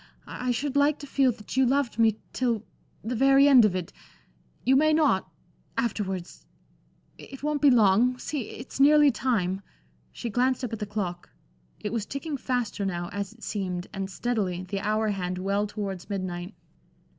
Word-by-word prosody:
I 255 - -4
should 275 +3 -1
like 285 +1 +3
to 285 - -9
feel 270 -2 +2
that 210 +2 -9
you 265 - +4
loved 260 -2 +1
me 220 -2 +4 0.2
till 235 -4 0 0.4
the 225 +4 -3
very 275 +3 +5
end 260 -5 +8
of 195 -3 +1
it. 180 -2 -4 0.7
You 265 - +5
may 310 +3 +4
not 295 -11 +2 0.5
afterwards. 195 -6 -3 0.8
It 270 0 -11
won't 300 -1 -1
be 290 - +7
long. 235 +1 +4
See 265 -2 -4
it's 250 +2 -9
nearly 295 +1 +6
time." 210 -6 -1 0.5
She 235 - -5
glanced 255 +3 +1
up 240 - -3
at 225 - -4
the 210 - -4
clock. 190 -4 -4 0.5
It 210 - -4
was 220 -3 -2
ticking 285 +2 -4
faster 245 -6 -2
now, 175 -3 -3
as 200 0 -3
it 225 +1 -17
seemed, 185 -4 -3
and 195 -1 -4
steadily, 195 -4 -2
the 195 +2 -4
hour 215 +2 0
hand 185 -3 -2
well 200 +3 0
towards 200 -3 -5
midnight. 185 -1 -4
220 Hz, 170 wpm, -27 LUFS, 195-265 Hz, 0.8 s, end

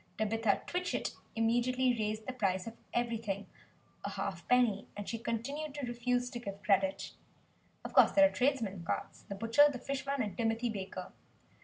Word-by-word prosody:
Tabitha 220 -1 +1
Twitchit 360 0 -1 0.2
immediately 245 +3 +2
raised 215 -1 -2
the 260 - -3
price 190 -6 0
of 230 - -7 0.2
everything 230 -4 -1 0.6
a - - -2
half 185 -4 -4
penny; 240 -5 +3
and 205 - -5
she 230 - -3
continued 275 +6 -3
to 290 -3 -3
refuse 245 +1 0
to 240 - -4
give 200 -3 -7
credit. 195 -1 +2 0.7
Of - - -6
course - - +8
there 290 -1 +8
are - - +5
the - - -13
trades 265 -2 +2
men's 195 -4 -5
carts - - -3
the 200 - -3
butcher, 230 +8 +5
the 260 - -5
fish 275 +2 -3
man 275 -2 +1
and 205 - -4
Timothy 230 0 0
Baker. 190 -3 -6
230 Hz, 180 wpm, -33 LUFS, 205-250 Hz, 0.7 s, course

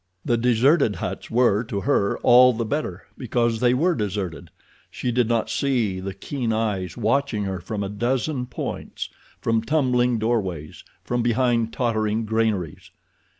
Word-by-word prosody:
The 120 - +2
deserted 120 +1 +3
huts - - -5
were, 115 -3 +3
to 100 -3 -3
her, 100 -7 +1
all 125 +1 +7
the 115 0 -2
better 110 - -3 0.2
because 120 -2 0
they 125 +1 +3
were 170 +7 +2
deserted—she 100 - -5
did 120 -1 +2
not 115 -2 +1
see 120 -9 0
the 95 +1 -5
keen 120 +3 -3
eyes 100 -6 -2
watching 115 -1 0
her 95 -2 -3
from 105 -1 -4
a 100 - -3
dozen 125 +5 -1
points, - - -5 0.3
from 115 -1 +1
tumbling 125 -3 +1
doorways, 95 -9 -2 0.2
from 120 0 -1
behind 120 -1 +1
tottering 110 -2 0
granaries. 110 -7 -1
115 Hz, 145 wpm, -23 LUFS, 105-125 Hz, 0.3 s, all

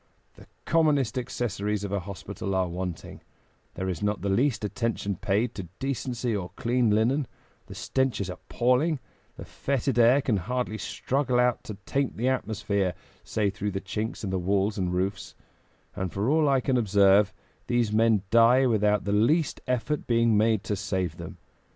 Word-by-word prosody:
"The - - -17 0.2
commonest 150 -8 +2
accessories 105 -5 -2
of 100 - -4
a 100 - 0
hospital 100 +1 -5
are 95 -1 +1
wanting; 90 -1 -6 0.5
there 95 - -3
is 90 -4 -3
not 105 0 -1
the 100 - 0
least 115 0 +1
attention 105 -2 -2
paid 105 +6 0
to 95 -4 -7
decency 125 -3 -2
or 90 -3 -4
clean 120 -1 +1
linen; 120 +6 +2 0.4
the - - -10
stench 130 -4 -1
is 100 - -2
appalling; 125 - 0 0.4
the - - -8
fetid 135 -2 -1
air 120 +4 +6
can 115 -7 +1
hardly 115 +3 -3
struggle 130 -2 -1
out 125 0 +2
to 105 - -6
taint 140 -1 -1
the 120 +4 +1
atmosphere, 105 -6 -1 0.3
save 105 -3 -1
through 105 -1 -3
the 95 - -1
chinks 105 +4 -4
in 95 - -3
the 95 - 0
walls 100 +3 +1
and 90 -3 -1
roofs; 95 +2 -2 0.6
and 95 -2 -3
for 100 - 0
all 155 -1 +3
I 135 -2 +3
can 130 0 +1
observe, 100 -2 +4 0.4
these 120 -3 +1
men 110 -2 +3
die 115 +3 +6
without 105 -3 +2
the 100 - -2
least 140 +9 +2
effort 125 +4 -1
being 115 -2 +3
made 110 0 +2
to 105 - -2
save 95 -4 -2
them. - - -8
110 Hz, 170 wpm, -27 LUFS, 100-125 Hz, 0.6 s, air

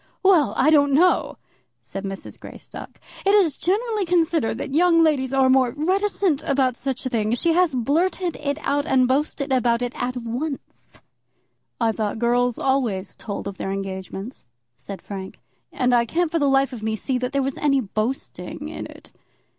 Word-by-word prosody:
"Well, 365 -7 +4
I 300 +4 +4
don't 285 -2 +4
know," 355 +6 +3 0.5
said 195 0 -7
Mrs. 195 0 -7
Greystock. - - -11 0.2
"It 395 +1 +4
is 365 -8 +3
generally 425 +3 0
considered 335 -7 +1
that 275 - -5
young 335 +1 +5
ladies 275 -5 +1
are 270 -1 +3
more 260 -1 +3
reticent 375 -1 +1
about 265 -3 +1
such 265 0 -4
things. 230 -2 0
She 335 - +2
has 350 -5 +2
blurted 335 +8 0
it 285 -1 -2
out 285 +1 0
and 255 -1 +3
boasted 280 +1 0
about 240 -1 +2
it 245 - -3
at 250 +1 -3
once." 250 +5 -6 0.8
"I 230 -2 +2
thought 215 -1 -3
girls 245 +1 +1
always 240 -8 -1
told 200 -2 -6
of 200 -1 -6
their - - -4
engagements," 195 - -6 0.3
said 195 +8 -9
Frank, 190 -2 -8 0.3
"and 250 -1 +1
I 235 -1 +3
can't 335 +4 0
for 330 - +1
the 285 -2 +2
life 270 0 +2
of 235 - -7
me 220 0 -1
see 255 +3 -2
that 250 0 -2
there 275 -1 0
was 270 0 -3
any 275 -2 +2
boasting 225 +4 -4
in - - -6
it." - - -15
265 Hz, 175 wpm, -23 LUFS, 235-315 Hz, 0.8 s, young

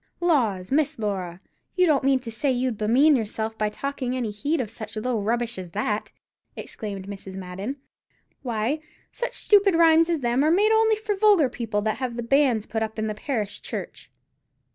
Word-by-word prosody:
"Laws, 235 - +1
Miss 300 +1 +1
Laura, 190 -5 -3 0.4
you 365 - +4
don't 295 -6 +2
mean 270 0 +4
to 235 -2 -6
say 275 +6 -1
as 260 - +2
you'd 250 -2 0
bemean 260 +8 +4
yourself 220 -1 -3
by 215 -1 0
taking 260 +1 -3
any 235 -4 -2
heed 285 +10 -1
of 225 -5 -3
such 220 -1 -8
low 235 +1 -1
rubbish 235 0 -1
as 180 -2 -7
that?" 210 +1 -2 0.4
exclaimed 200 -3 -6
Mrs. 195 -1 -8
Madden; 190 +7 -5 0.7
"why, 240 +4 -1 0.3
such - - -4
stupid 405 -3 +4
rhymes 330 0 +5
as 330 -4 0
them 240 +2 +1
are - - +3
only 435 +5 +4
made - - -10
for 425 -1 -1
vulgar 390 -9 +4
people 220 -4 -3
that 215 0 -1
have 255 -3 -3
the 240 - -4
banns 250 -3 +2
put 220 - -3
up 220 0 -3
in 215 - -1
the 215 - -2
parish 215 -2 -3
church. - - -7
240 Hz, 190 wpm, -24 LUFS, 215-295 Hz, 0.7 s, rhymes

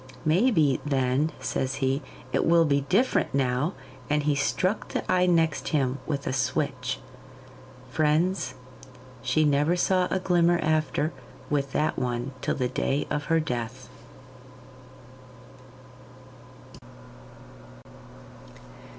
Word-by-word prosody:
'Maybe, 160 - +3
then,' 135 +1 +1
says 130 0 -2
he, 135 +1 0 0.3
'it - - +2
will 165 0 +4
be 140 -2 +2
different 210 - +2
now,' 135 +5 +1 0.4
and 150 0 +1
he 150 0 +2
struck 185 +8 0
the - - -3
eye 180 0 +3
next 165 -3 +2
him 135 -3 0
with 140 -2 -2
a - - -1
switch. 130 -1 -1 0.9
Friends, 155 -1 +1 0.7
she 130 +5 +2
never 150 +4 +3
saw 180 0 +2
a - - 0
glimmer 175 -2 +3
after 155 -1 0 0.4
with 140 -2 0
that 155 - 0
one 125 +1 -2
till - - -1
the 125 -2 0
day 135 +2 -1
of 145 0 -1
her 165 -1 +2
death. 125 -3 -4
145 Hz, 110 wpm, -26 LUFS, 130-165 Hz, 0.9 s, will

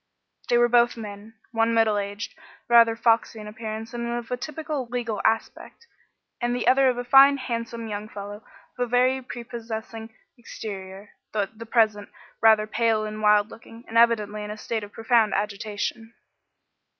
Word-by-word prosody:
They 240 - +4
were 240 0 +5
both 240 0 +3
men 210 0 -9 0.2
one 225 0 +1
middle 220 -2 +3
aged, 205 0 -5 0.3
rather 230 -1 +6
foxy 225 -1 +1
in 210 - -8
appearance 220 +1 -7
and 235 0 -3
of 240 0 -5
a - - +1
typically 300 0 -5
legal 235 -4 -3
aspect, 225 - -2 0.6
and 240 0 0
the 245 - -2
other 265 0 +5
a 245 -1 -2
fine, 275 +2 +7
handsome 230 -3 -4
young 210 0 -5
fellow 205 +1 -8 0.4
of 245 -1 -1
very 255 +2 +2
prepossessing 230 -2 -7 0.3
exterior, 200 -3 -8 0.2
though 215 - +1
at 220 +3 -7
present 215 -3 +2 0.3
rather 220 -1 +5
pale 220 0 +1
and 215 0 -6
wild 210 0 +4
looking, 230 +1 -13
and 225 - -9
evidently 215 -3 +3
in 210 - -7
a 210 - -6
state 220 0 -3
of 205 - -9
profound 225 -1 +2
agitation. 210 +2 -4
225 Hz, 160 wpm, -25 LUFS, 215-240 Hz, 0.6 s, fine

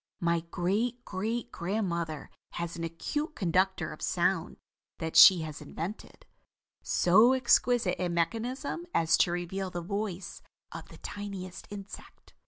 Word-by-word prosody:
My 170 0 +1
great 225 +8 -1
great 225 +5 -3
grandmother 170 -5 -3 0.2
has 170 -1 -4
an 170 - -5
acute 295 - -3
conductor 185 +1 0
of - - -13
sound - - 0 0.4
that 160 -1 -4
she 180 -3 +9
has 155 -1 -6
invented, 165 +7 -7 0.6
so 215 +8 +5
exquisite 245 -6 +2
in 175 - -1
mechanism 245 - -2
as 160 -1 +4
to 175 - +3
reveal 175 +2 -3
the 175 -1 -5
voice 200 -1 -4 0.3
of - - -8
the - - -13
tiniest 195 -3 -7
insect. 200 -1 -11
185 Hz, 130 wpm, -29 LUFS, 170-220 Hz, 0.6 s, she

